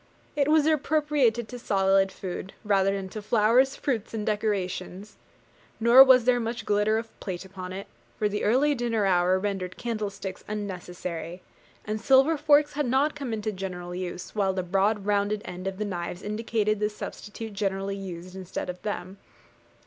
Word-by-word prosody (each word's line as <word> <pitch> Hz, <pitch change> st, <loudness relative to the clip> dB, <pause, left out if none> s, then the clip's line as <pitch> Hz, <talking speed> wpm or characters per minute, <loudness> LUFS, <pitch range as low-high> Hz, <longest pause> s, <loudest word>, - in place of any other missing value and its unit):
It 285 Hz, -1 st, +2 dB
was 305 Hz, -1 st, +4 dB
appropriated 295 Hz, -6 st, +2 dB
to 245 Hz, -, -7 dB
solid 195 Hz, -2 st, +2 dB
food, 185 Hz, 0 st, -6 dB
rather 195 Hz, -2 st, +3 dB
than 195 Hz, -1 st, -3 dB
to 215 Hz, -, -6 dB
flowers, 230 Hz, +5 st, +3 dB
fruits, 230 Hz, -5 st, -2 dB
and 210 Hz, -1 st, -3 dB
decorations. 205 Hz, -2 st, -2 dB, 0.6 s
Nor 235 Hz, +4 st, +9 dB
was 260 Hz, -2 st, +6 dB
there 250 Hz, -1 st, +4 dB
much 230 Hz, +1 st, -4 dB
glitter 210 Hz, +1 st, +2 dB
of 225 Hz, 0 st, -7 dB
plate 185 Hz, -1 st, -5 dB
upon 185 Hz, -1 st, -8 dB
it; 195 Hz, +1 st, -6 dB, 0.3 s
for 210 Hz, -, +1 dB
the 210 Hz, 0 st, -3 dB
early 270 Hz, +7 st, +3 dB
dinner 235 Hz, -5 st, 0 dB
hour 180 Hz, 0 st, +3 dB
rendered 190 Hz, -2 st, -3 dB
candlesticks 205 Hz, -5 st, -4 dB
unnecessary, 180 Hz, -4 st, -5 dB, 0.4 s
and 215 Hz, 0 st, -3 dB
silver 270 Hz, +6 st, +5 dB
forks 295 Hz, 0 st, +4 dB
had 295 Hz, -2 st, -1 dB
not 270 Hz, +5 st, +2 dB
come 275 Hz, -4 st, -5 dB
into 215 Hz, -1 st, -2 dB
general 180 Hz, -2 st, -6 dB
use: 180 Hz, 0 st, -5 dB
while 195 Hz, -3 st, +1 dB
the 185 Hz, -1 st, -2 dB
broad 195 Hz, +3 st, +1 dB
rounded 205 Hz, +1 st, +1 dB
end 180 Hz, 0 st, -6 dB
of 195 Hz, -1 st, -4 dB
the 210 Hz, -, -2 dB
knives 175 Hz, -2 st, -5 dB
indicated 215 Hz, 0 st, -1 dB
the 210 Hz, 0 st, +1 dB
substitute 210 Hz, +1 st, -7 dB
generally 195 Hz, -1 st, -2 dB
used 185 Hz, -2 st, -8 dB
instead 185 Hz, -1 st, -4 dB
of 180 Hz, -, -14 dB
them. 195 Hz, -2 st, -5 dB
210 Hz, 165 wpm, -27 LUFS, 190-235 Hz, 0.6 s, Nor